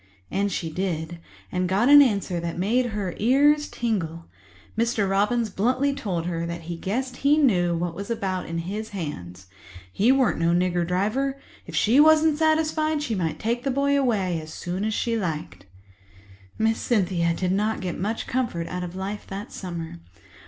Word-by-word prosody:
And 200 +1 0
she 165 -3 -3
did—and 175 +1 -4
got 200 +6 +2
an 290 +1 +9
answer 200 -8 +1
that 170 0 -4
made 235 +7 +1
her 205 -5 -3
ears 290 +6 +4
tingle. 170 -8 -2 0.5
Mr. 225 -2 +1
Robins 210 +3 +1
bluntly 255 +8 +1
told 195 -12 -3
her 170 -1 -2
he 170 0 -5
guessed 245 +9 -3
he 285 +2 +3
knew 180 - +3
what 175 0 -2
was 200 +4 -7
what 230 - -1
about 185 -4 -3
his 185 +6 -4
hands. 95 - -6 0.5
He 225 +6 +4
weren't 265 -8 +2
no 170 0 +2
nigger 175 -1 +1
driver. 230 +10 0 0.3
If - - -7
she 235 +6 +4
wasn't 310 0 +5
satisfied, 315 -1 +1
she 235 - -2
might 170 -6 -1
take 235 +2 -1
the 275 - 0
boy 280 +2 +2
away 200 - +1
as 155 0 -10
soon 180 +5 -4
as 220 -1 -1
she 230 -1 0
liked. 160 - -4 0.9
Miss 225 0 +1
Cynthia 180 -7 +1
did 185 0 -1
not 210 +3 0
get 180 -2 -3
much 215 +5 -2
comfort 235 -10 -2
out 180 0 -4
of 180 0 -6
life 195 +2 -5
that 195 +2 -7
summer. 170 - -6
200 Hz, 170 wpm, -25 LUFS, 175-245 Hz, 0.9 s, an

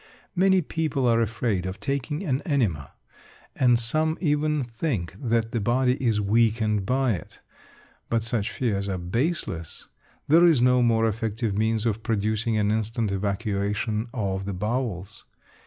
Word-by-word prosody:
Many 190 0 +4
people 150 -5 -1
are 115 -1 +3
afraid 105 -4 -1
of 95 - -6
taking 140 +5 -2
an 135 -6 -1
enema, 110 - -1 0.6
and 125 -2 +4
some 155 +8 +1
even 150 -2 +1
think 115 - -3
that 115 -2 0
the 115 - -1
body 125 +4 +2
is 115 -4 +2
weakened 105 -1 +1
by 130 -1 +2
it; 85 - -8 0.7
but 115 -1 +1
such 115 -2 -1
fears 100 -6 -1
are 95 - -2
baseless. 95 - -3 0.4
There 170 +4 +6
is 160 -6 +4
no 125 +1 +4
more 115 -1 +3
effective 110 0 -2
means 110 +1 0
of 110 -1 0
producing 110 +1 0
an 105 -1 +1
instant 110 0 -1
evacuation 105 +2 -1
of 95 -6 -2
the 100 - -3
bowels. 105 -1 -3
115 Hz, 145 wpm, -25 LUFS, 105-130 Hz, 0.7 s, There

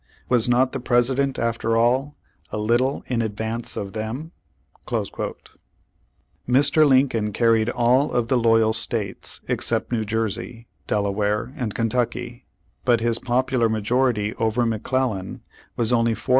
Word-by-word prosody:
Was 125 -1 +2
not 125 +1 +3
the 135 - -4
Presi 120 +1 +2
dent, 140 0 0
after 115 -1 0
all, 130 +5 +1 0.3
a - - -4
little 120 +6 +1
in 120 -2 -1
advance 110 +2 -4
of 100 -1 -5
them?"' 115 +9 -5 0.6
Mr. 145 +4 -2
Lincoln 130 -5 +2
carried 115 +1 +2
all 125 +5 +2
of 120 -2 0
the 130 - +2
loyal 115 -1 +3
states, 110 -3 -2
ex - - -1
cept - - -1
New 115 -3 0
Jersey, 115 +2 -3 0.2
Delaware 105 +3 -1
and 120 -8 -4
Kentucky, 120 +1 -2 0.4
but 120 -2 +3
his 115 0 0
popular 125 -1 +1
majority 110 0 0
over 115 +2 +1
McClellan 115 -3 -2 0.3
was 120 +1 +1
only 115 -1 +2
411,428. 110 - -14
115 Hz, 135 wpm, -23 LUFS, 110-125 Hz, 0.6 s, not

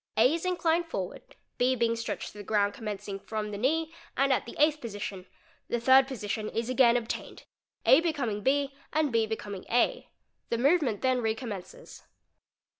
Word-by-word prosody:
A 245 +6 +5
is 335 +2 -3
inclined 345 -2 +1
forward, 190 - -6 0.2
B 255 +1 +3
being 230 -1 +1
stretched 230 0 -4
to 210 - -12
the - - -6
ground 205 0 +1
commencing 205 -2 -5
from 215 0 -4
the 205 - -4
knee 320 +6 0 0.2
and 275 0 +4
at - - -1
the - - -8
Eighth 305 0 +3
Position—the 205 +1 -6
third 260 +3 +6
position 215 -4 -3
is 230 +2 -2
again 245 -2 +5
obtained, 235 -1 -5 0.4
A 270 - +7
becoming 275 -11 -1
B 275 +3 +1 0.2
und 305 -2 +2
B 225 -1 +2
becoming 205 -3 -5
A; 245 - +1 0.4
the 235 - 0
movement 270 - +2
then 255 -1 +2
recommences. 220 - -5
240 Hz, 165 wpm, -29 LUFS, 215-280 Hz, 0.4 s, A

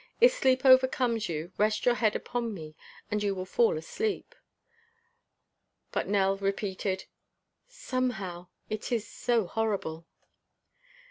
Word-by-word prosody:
If - - +7
sleep 260 - +2
overcomes 255 -4 +4
you, 165 +2 -4
rest 215 +1 +2
your 245 - +5
head 220 -3 +1
upon 235 -3 -3
me 155 -3 -9 0.4
and 210 0 0
you 200 -1 0
will 185 -1 -4
fall 470 - +2
asleep." 440 -4 -3 1.6
But - - -1
Nell 195 -1 +2
repeated: 195 -1 -2 0.6
"Somehow 250 - -3 0.2
it 215 +2 -4
is 230 -3 0
so 235 -1 0
horrible!" 180 -6 -2
215 Hz, 120 wpm, -29 LUFS, 195-255 Hz, 1.6 s, If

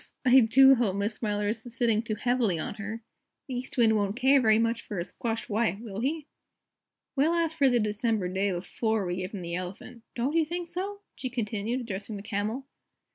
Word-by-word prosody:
I 255 +1 +8
do 265 +3 +7
hope 230 -7 +1
Miss 200 +2 -1
Smiler 210 -2 -1
isn't 225 +2 -4
sitting 230 -2 +1
too 225 -2 -3
heavily 240 -6 +1
on 155 - -3
her; 220 +3 -5 0.4
the 265 - -5
East 250 +2 -5
Wind 225 -2 +5
won't 205 -1 0
care 265 +2 +4
very 220 -2 +5
much 230 +1 +1
for 205 - -7
a 170 - -2
squashed 225 +4 -3
wife, 215 -3 0
will 215 -3 -6
he?" 295 +5 -1 0.9
"We'll 305 +5 +3
ask 330 -1 0
for 280 -4 +4
the 245 -1 +3
December 215 -2 0
day 190 +2 0
before 205 +4 -1
we 175 0 -2
give 185 +2 -4
him 185 - -5
the 170 0 -5
Elephant, 185 +6 -6
don't 250 +5 -1
you 330 - +4
think 345 +2 -4
so?" 395 +4 -4
she 255 - -5
continued, 230 0 -2
addressing 210 -2 -5
the 200 - -8
Camel. 220 +5 -3
225 Hz, 205 wpm, -28 LUFS, 205-255 Hz, 0.9 s, I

